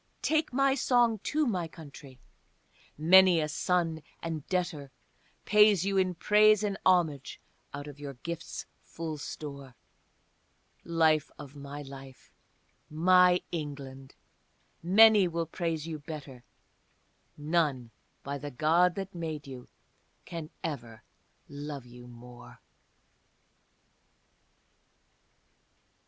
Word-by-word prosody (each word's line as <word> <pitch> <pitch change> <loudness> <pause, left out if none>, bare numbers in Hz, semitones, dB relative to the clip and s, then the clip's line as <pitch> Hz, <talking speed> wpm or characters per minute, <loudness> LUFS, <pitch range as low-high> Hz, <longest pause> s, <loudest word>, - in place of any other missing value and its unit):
Take 315 0 +1
my 275 +1 +2
song 240 -5 +2
too, 305 +9 0
my 185 -9 -1
country: 145 -5 -13 0.8
many 180 +2 +6
a 155 - 0
son 165 0 -1 0.2
and 165 -3 -4
debtor 175 -6 -2 0.6
Pays 210 -3 +5
you 200 0 -1
in 185 -1 +1
praise 215 +3 +4
and 205 -1 -1
homage 165 -7 +1 0.3
out 145 0 -7
of 145 -1 -11
your 140 -2 -7
gifts' 170 +6 -7 0.2
full 160 -2 -7
store; 140 -3 -8 1.1
Life 160 -2 +2
of 140 +1 -11
my 145 +1 -8
life, 135 -1 -12 0.6
my 180 +3 +4
England, 140 -4 -7 0.7
many 205 +2 +6
will 170 -1 -2
praise 165 -1 -3
you 160 -2 -5
better, 145 -4 -9 0.9
None, 145 -6 -1 0.3
by 140 +1 -5
the 145 +2 -6
God 165 +7 +2
that 195 0 -6
made 160 -4 -5
you, 130 -3 -10 1.0
ever 120 -8 -6
can - - -42 0.2
love 145 -2 -7
you 125 0 -13
more! 120 0 -14
160 Hz, 105 wpm, -29 LUFS, 140-180 Hz, 1.1 s, many